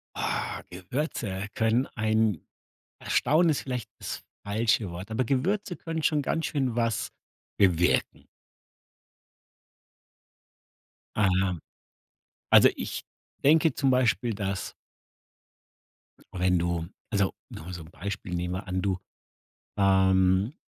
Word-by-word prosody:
Oh, - - -2
Gewürze 100 - -3
können 115 +4 +2
ein 110 -4 +1 0.6
erstaunen 165 +3 +3
ist 150 - +1
vielleicht 125 -5 -4
das - - -5 0.2
falsche 110 0 +1
Wort, 90 +5 -7
aber 110 +3 0
Gewürze 175 - 0
können 165 0 -4
schon 150 -1 +2
ganz 160 +2 -1
schön 130 -6 -1
was 115 -2 0 0.5
bewirken. 90 -3 +2 2.9
Ah. 95 -3 +2 0.9
Also - - +8
ich - - -4 0.4
denke 155 0 +5
zum 135 -2 +2
Beispiel, 120 -2 +2
dass 100 -1 -3 1.6
wenn 90 0 +3
du 85 -1 -1 0.2
also 100 -2 +1 0.2
nur 90 +4 -8
so 85 - -6
'n 80 - -15
Beispiel, 95 0 -5
nehmen 90 0 -2
wir 95 +2 -6
an 95 0 -1
du, 95 -2 0 0.8
ähm, 95 +2 +3
105 Hz, 105 wpm, -27 LUFS, 95-130 Hz, 2.9 s, Also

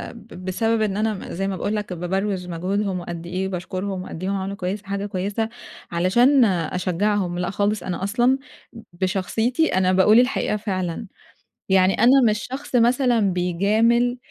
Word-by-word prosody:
ب 210 -5 -12
بسبب 225 +4 0
إن 205 -2 0
أنا 220 0 +1
م 195 - -7
زي 195 +3 -2
ما 195 - -2
باقول 210 - -2
لك 205 -3 -4
بابَروِز 185 +1 -2
مجهودهم، 185 +2 -2
وقد 170 -1 -7
إيه 185 +2 -2
باشكُرهم، 185 +1 -4
وقد 180 -1 -8
إيه 190 - -1
هم 200 - 0
عملوا 195 +1 -3
كويس 195 +2 -3
دي 195 - -23
حاجة 200 0 -3
كويسة 205 +3 -2 0.4
علشان 240 +10 +4
أشجّعهم. 180 +1 0
لأ 180 - -1
خالص 205 +2 -1
أنا 180 0 -4
أصلًا 240 +6 +2 0.4
ب 230 - -10 0.2
بشخصيتي 220 - 0
أنا 185 0 +3
باقول 210 +5 +6
الحقيقة 250 -4 +1
فعلًا. 190 -1 -3 0.6
يعني 190 0 +4
أنا 260 +3 +5
مش 210 +3 -2
شخص 265 0 -5
مثلًا 245 0 +3
بيجامل، 220 +8 +2
200 Hz, 170 wpm, -22 LUFS, 185-225 Hz, 0.6 s, باقول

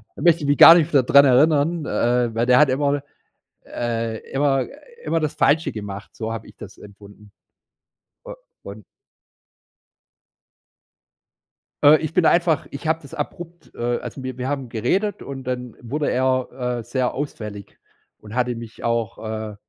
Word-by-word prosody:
Da - - -10
möchte 170 -1 +4
ich 145 - -3
mich 145 - +2
gar 165 - +11
nicht 170 -1 +2
f 135 -3 +4
daran 140 +2 +6
erinnern, 150 +4 +3
äh, 120 -1 0
weil 115 +1 0
der 125 - +5
hat 150 - +5
immer, 140 +2 0 0.6
äh, 115 -1 -3
immer 135 -1 +1 0.4
immer 165 - 0
das 155 -1 -2
Falsche 155 +4 +2
gemacht, 105 -1 -8
so 110 -1 -4
habe 115 - -7
ich - - -17
das - - -11
empfunden. 100 0 -15 1.0
U - - -8 0.3
und 100 +2 -10 3.0
Äh, 150 +2 +8
ich 155 0 -5
bin 180 - +2
da - - +5
einfach 170 -2 +1
Ich 140 +3 -7
habe 160 0 0
das 140 +1 -14
abrupt. 170 +3 -7
Äh, 120 0 -1
also 135 - -8
wir 130 -1 -6
wir 125 +1 -4
haben 135 -3 -3
geredet. 190 - -1
Und 135 -1 -8
dann 125 -2 -5
wurde 145 +5 -2
er, 130 -1 -1
äh, - - -7
sehr 125 +2 -2
ausfällig 105 -8 -7 0.4
und 110 +2 -11
hatte 125 -1 0
mich 115 -1 -10
auch, 115 -3 -1 0.4
äh, - - -14
130 Hz, 165 wpm, -21 LUFS, 115-150 Hz, 3.0 s, gar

